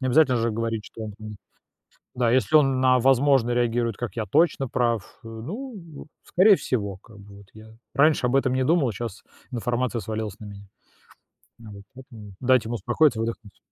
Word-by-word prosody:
Необязательно 130 0 +3
же 115 +1 0
говорить, 115 -1 -3
что 110 - -9
он 105 - -7
там 110 -1 -9 0.8
да, 120 -2 +1
если 130 +5 +2
он 135 -3 +2
на 130 -1 +4
"возможно" 135 -1 +3
реагирует 120 -2 0
как: 120 -2 -5
"Я 110 - -2
точно 145 - +1
прав", 115 -4 -2
э, - - -10
ну, 170 - -8 0.2
скорее 195 +3 +5
всего, 100 -6 -3
как 110 +2 -18
бы 100 0 -14
вот 100 -1 -16
я 110 0 -14 0.3
раньше 150 -1 +3
об 125 - 0
этом 130 -2 +2
не 130 0 0
думал, 160 -5 +2
а - - -5
щас 110 -1 -7 0.3
информация 120 0 -2
свалилась 110 -2 -5
на 105 - -10
меня. 100 -1 -11 0.9
Вот. 105 -3 -12
Поэтому 115 -7 -13
дайте 125 -3 +2
ему 120 - -3
успокоиться, 120 - +1
выдохнуть. 115 -2 -6
120 Hz, 180 wpm, -24 LUFS, 110-130 Hz, 0.9 s, скорее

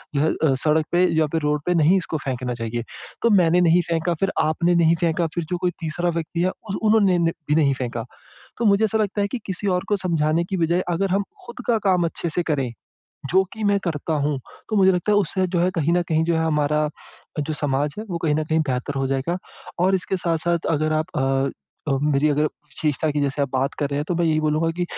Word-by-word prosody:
जो 140 - +2
है 160 - +2 0.2
अ, - - +3
सड़क 155 0 +2
पे 180 +1 +4
या 155 - +3
फिर 160 - +1
रोड 150 0 0
पे 180 - +3
नहीं 165 +4 +4
इसको 165 -3 -2
फेंकना 125 -2 -2
चाहिए। 115 0 -4 0.4
तो 235 - +5
मैंने 175 +1 +3
नहीं 175 +1 +5
फेंका, 165 +1 0
फिर 195 - +2
आपने 170 +3 +1
नहीं 170 -1 +4
फेंका, 165 0 +1
फिर 170 -2 -1
जो 180 - +1
कोई 180 -1 +1
तीसरा 175 +1 -1
व्यक्ति 165 +1 -3
है, 185 - +2 0.2
उस 195 - -2
उन्होंने 210 -4 +4
ने 170 -1 +2 0.2
भी 150 - +3
नहीं 145 -4 +3
फेंका। 120 -1 -3 0.5
तो 235 - -1
मुझे 205 +1 +4
ऐसा 220 +1 +1
लगता 205 -1 0
है 200 - 0
कि 255 - -3
किसी 190 +1 -4
और - - -5
को 205 - +2
समझाने 160 0 +1
की 190 - 0
बजाय, 170 +1 +1
अगर 190 +3 0
हम 200 +1 +1 0.2
खुद 240 +1 -9
का 230 -2 +3
काम 180 -2 +3
अच्छे 170 - -4
से 175 - 0
करें, 140 -7 -1 0.6
जो 190 +2 +5
कि 220 -1 -5
मैं 200 0 +3
करता 160 -1 -2
हूँ, 145 -1 0 0.3
तो 215 - -1
मुझे 190 -1 +5
लगता 180 +4 0
है, - - +4
उससे 190 0 0
जो 175 -1 -1
है 180 +2 +2
कहीं 165 0 +1
न 175 0 +3
कहीं 160 0 +2
जो 170 0 +1
है, 160 - +1
हमारा 150 -1 +1 0.5
जो 155 +2 -2
समाज 145 0 -1
है, 215 - -4
वो 170 - -2
कहीं 150 -3 +2
न 155 - 0
कहीं 160 +1 +1
बेहतर 130 +2 -2
हो 135 - 0
जाएगा। 135 +6 -1 0.4
और 190 +2 +3
इसके 190 0 -1
साथ-साथ 170 -1 0
अगर 155 0 +1
आप - - -13
अ 135 +1 +1 0.4
अ, - - +2
मेरी 150 0 +2
अगर 150 +1 +2
विशेषता 150 0 -2
की 145 0 -1
जैसे 140 0 -1
आप 140 - 0
बात 135 +1 0
कर 145 - 0
रहे 140 - -2
हैं, 145 - -1
तो 175 - 0
मैं 170 0 +1
यही 155 -1 +2
बोलूँगा 155 +2 +1
कि 175 - 0
165 Hz, 245 wpm, -22 LUFS, 150-180 Hz, 0.6 s, तो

